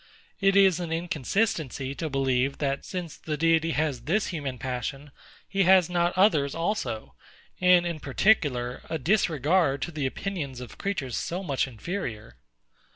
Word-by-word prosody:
It 195 -1 +3
is 190 -3 +5
an 170 -2 -4
inconsistency 165 - -1
to 160 +2 -4
believe, 135 -1 +1
that, 140 -1 -2
since 175 -4 -5
the 155 -1 -4
Deity 165 +1 +2
has 145 -6 -1
this 195 +8 +1
human 145 -7 -4
passion, 130 +3 -4 0.4
he 195 - 0
has 185 -2 +5
not 175 0 +1
others 155 -8 +3
also; 165 - -2 0.5
and, 180 -1 +5
in 170 -2 -3
particular, 135 - +1
a 160 - -1
disregard 160 - +2
to 175 - -4
the 150 -4 -1
opinions 145 -5 -4
of 125 -2 -10
creatures 155 - -2
so 180 +3 -3
much 140 -6 0
inferior. 115 - -6
160 Hz, 150 wpm, -27 LUFS, 135-180 Hz, 0.5 s, is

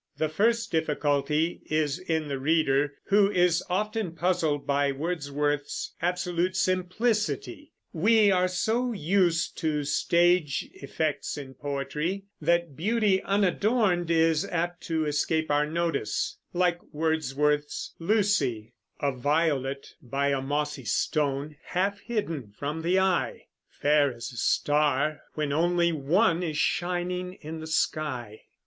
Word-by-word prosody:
The 155 - 0
first 230 +7 +1
difficulty 150 0 0
is 155 0 0
in 160 -4 -2
the 140 -2 -3
reader, 145 -1 +2
who 200 0 +5
is 180 -3 +2
often 210 -1 -1
puzzled 165 -4 0
by 140 0 +2
Wordsworth's 145 -1 -2
absolute 180 0 0
simplicity. 205 +9 -1 0.2
We 210 +4 +4
are 185 -1 +3
so 230 +7 0
used 175 -2 +1
to 150 -2 0
stage 170 +1 +2
effects 150 +2 -3
in 135 -2 -8
poetry, 150 +7 -3 0.2
that 170 -1 +1
beauty 205 - +2
unadorned 200 -2 +1
is 165 0 +3
apt 175 -2 -2
to 160 -2 0
escape 155 +1 0
our 145 +1 +2
notice, 170 +1 -1
like 175 -1 +1
Wordsworth's 150 -2 0
"Lucy": 165 - +1 0.3
A 140 -1 +2
violet 140 0 -1
by 140 +3 -1
a 140 -1 0
mossy 145 0 -2
stone, 145 +5 -1
Half 200 +3 -1
hidden 200 - -3
from 150 +3 -3
the 175 +3 +2
eye; 190 -2 0 0.2
Fair 145 -1 +2
as 120 +2 -7
a - - -11
star, 150 +4 +1 0.2
when 150 -2 -1
only 170 +2 +2
one 165 +5 +2
Is 160 -4 -2
shining 180 +1 -1
in 160 -2 -8
the 160 - -7
sky. 130 -8 -2
160 Hz, 125 wpm, -27 LUFS, 145-180 Hz, 0.3 s, who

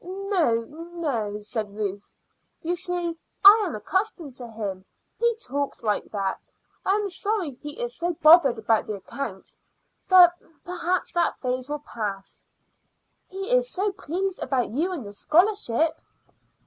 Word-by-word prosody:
"Oh 365 - 0
no," 300 -10 -4
said 210 -1 -5
Ruth. 205 -1 -4 0.5
"You 340 +2 0
see, 350 -2 -3 0.3
I 425 +2 +10
am 330 - -4
accustomed 345 - -2
to 245 - -5
him. 205 -4 -5 0.4
He 470 0 +2
talks 285 - -3
like 210 -2 0
that. 195 -2 -3 0.3
I 385 - +2
am 420 -1 0
sorry 395 -3 -2
he 295 - -9
is 485 0 -3
so 345 +1 -1
bothered 305 -5 +6
about 220 0 +1
the 215 - -3
accounts, 195 0 -7 0.5
but 360 -2 +8 0.3
perhaps 360 0 -1
that 345 -1 +1
phase 255 +1 -3
will 295 0 -4
pass." 200 -3 -5 0.8
"He 390 +4 -4
is - - +3
so 400 0 0
pleased 380 +2 -3
about 255 -4 0
you 315 - -1
and 310 -11 -5
the 200 - -8
scholarship." 325 - +2
320 Hz, 145 wpm, -25 LUFS, 230-370 Hz, 0.8 s, I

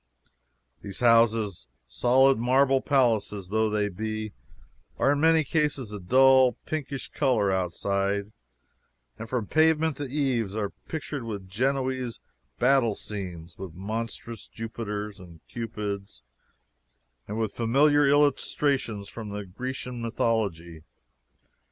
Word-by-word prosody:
These 100 +1 -8
houses, 115 - +3 0.2
solid 130 - +3
marble 130 +2 +3
palaces 110 -8 +1
though 110 +1 +1
they 105 -1 0
be, 110 +2 -4 0.6
are 140 - +3
in 145 0 +1
many 160 0 +5
cases 145 -6 -1
of 105 -2 -6
a - - -15
dull 130 +2 +6
pinkish 140 -4 -4
color, 120 -9 +1
outside, 100 +2 -1 0.9
and 115 0 -7
from 125 -4 -1
pavement 160 +1 +2
to 145 - -4
eaves 125 -8 -1
are 105 -2 -2 0.2
pictured 145 -4 -4
with 100 -4 -6
Genoese 130 +3 -1 0.4
battle 125 -4 +3
scenes, 90 -6 -7
with 95 -4 -7
monstrous 110 +3 -5
Jupiters 105 -2 -5
and 85 -3 -13
Cupids, 105 - -5 1.0
and 105 - -4
with 110 -2 -1
familiar 145 +5 +3
illustrations 140 -6 +1
from 105 -3 -6
Grecian 125 +1 -5
mythology. 100 -8 -1
115 Hz, 115 wpm, -27 LUFS, 100-135 Hz, 1.0 s, dull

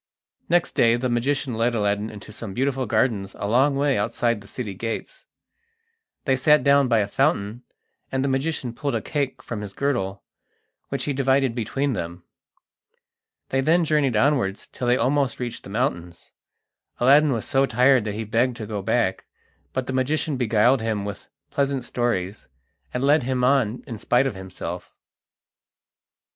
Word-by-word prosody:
Next 175 +1 +2
day 115 0 +4
the 125 +1 -1
magician 130 +2 0
led 115 +2 +1
Aladdin 105 0 0
into 105 0 -10
some 105 -2 -7
beautiful 130 -1 0
gardens 110 -3 0
a 100 - -3
long 135 +6 +3
way 140 -3 +1
outside 115 +1 0
the 100 - -15
city 105 -4 -5
gates. 115 +4 -6 1.0
They 135 - +3
sat 150 +3 +4
down 140 -1 +4
by 115 -3 +3
a 100 - -1
fountain, 120 -3 0 0.5
and 130 0 0
the - - +1
magician 135 -2 -1
pulled 140 +3 -2
a - - -1
cake 140 -3 -3
from 115 -3 -5
his 100 -2 -7
girdle, 100 -9 -2 0.7
which - - -2
he 145 - -1
divided 135 -1 +2
between 135 +4 -1
them. 85 -3 -5 1.3
They 135 - +1
then 165 +4 +3
journeyed 150 -5 +2
onwards 115 -5 +1
till 125 - -4
they 125 +1 +4
almost 135 0 +1
reached 120 -2 -5
the - - -9
mountains. 85 -4 -3 0.7
Aladdin 140 +4 +5
was 115 -4 -2
so 135 0 +2
tired 125 +1 +4
that 105 -1 -3
he 110 - -3
begged 115 +3 0
to 110 - -5
go 105 -1 -4
back, 95 - 0 0.5
but 130 -1 -2
the 130 - -4
magician 145 +3 0
beguiled 120 +1 +3
him 110 -3 -2
with 100 -1 -7 0.2
pleasant 140 -2 0
stories, 105 -6 -2 0.4
and 125 - -2
led 145 +2 +4
him 125 0 -1
on 125 -3 +2
in 115 -7 -7
spite 125 +5 +2
of 135 - -1
himself. 95 -1 -7
125 Hz, 165 wpm, -24 LUFS, 110-135 Hz, 1.3 s, Aladdin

